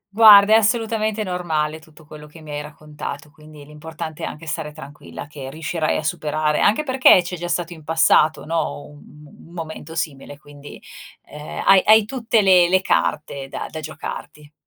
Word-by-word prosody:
Guarda, 210 -2 +8
è - - +8
assolutamente 220 -1 0
normale 160 -5 -3
tutto 160 -1 -19
quello 150 0 -12
che 150 +2 -16
mi 155 -1 -11
hai 145 0 -4
raccontato, 150 -1 -9
quindi 150 -1 -15
l'importante 155 +1 -9
è - - -3
anche 160 +2 -9
stare 150 0 -5
tranquilla, 140 - -11
che 140 -2 -9
riuscirai 155 +2 -2
a - - -4
superare 155 -2 -1
anche 220 +9 +2
perché 260 -9 +5
c'è 180 +1 -6
già 175 0 -6
stato 175 0 -3
in 160 -2 -14
passato, 160 0 +2
no, 160 -2 -3
un 150 - -15
m 150 0 -17 0.3
un 175 - -8
momento 160 0 -8
simile 145 -3 -5
quindi, 145 -1 -14 0.5
ehm, 150 0 -8
hai 195 -1 +6
hai 220 0 +6
tutte 230 -2 0
le 180 -2 +5
le 190 +1 +3
carte 140 -6 -2
da - - -6
da 160 - -6
giocarti. 150 -1 -9
155 Hz, 180 wpm, -20 LUFS, 150-180 Hz, 0.5 s, Guarda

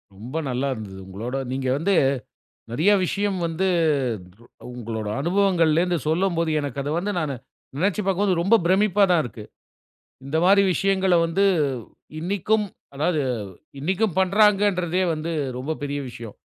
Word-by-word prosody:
ரொம்ப 120 +9 -9
நல்லா 130 +2 -1
இருந்தது 100 -4 -8
உங்களோட 115 +7 -5 0.2
நீங்க 130 0 -2
வந்து 185 +7 +1 0.8
நெறைய 160 - +3
விஷயம் 200 +1 -1
வந்து 165 +4 -1 1.1
உங்களோட 110 -3 -5
அனுபவங்கள்லிருந்து 175 -1 +2
சொல்லும்போது, 170 -1 +1
எனக்கு 140 -1 -4
அத 145 - -3
வந்து 205 +3 -2
நானு, 145 -3 -2 0.4
நெனச்சு 195 +6 0
பார்க்கும்போது, 195 0 +2
ரொம்ப 210 +6 +5
பிரமிப்பா 200 +2 +4
தான் 170 -3 +4
இருக்கு. 110 -2 -8 0.8
இந்த 145 +4 -1
மாரி 200 +1 +6
விஷயங்கள 190 0 +2
வந்து 170 +4 +1 0.8
இன்னைக்கும் 200 +4 0 0.3
அதாவது 155 +1 +1 0.6
இன்னைக்கும் 185 +5 0
பண்றாங்கன்றதே 190 -2 +3
வந்து 155 +2 -4 0.3
ரொம்ப 145 +5 -3
பெரிய 145 0 -2
விஷயம். 115 -3 -9
170 Hz, 125 wpm, -23 LUFS, 140-195 Hz, 1.1 s, மாரி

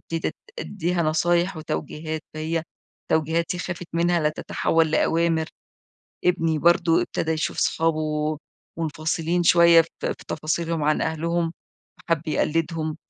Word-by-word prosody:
ابتديت 165 0 -3 0.2
أد - - -4
أدّيها 175 -3 -1
نصايح 170 +3 +1
وتوجيهات، 155 0 -4
فهي 160 +1 -2 0.5
توجيهاتي 165 +3 +1
خافت 175 0 -5
منها 170 0 +2
لَتتحول 160 +1 0
لأوامر. 165 0 +2 0.8
ابني 165 -3 +2
برضو 170 0 +4
ابتدى 160 - -2
يشوف 160 0 -2
صحابه 155 -1 0 0.4
منفصلين 165 +2 -1
شوية 170 0 +7
في 165 - -11 0.2
في - - -5
تفاصيلهم 160 +1 -1
عن 150 +1 +2
أهلهم، 165 +1 -1 0.5
فحَبّ 165 -1 0
يقلّدهم. 155 0 -1
165 Hz, 115 wpm, -24 LUFS, 155-170 Hz, 0.8 s, شوية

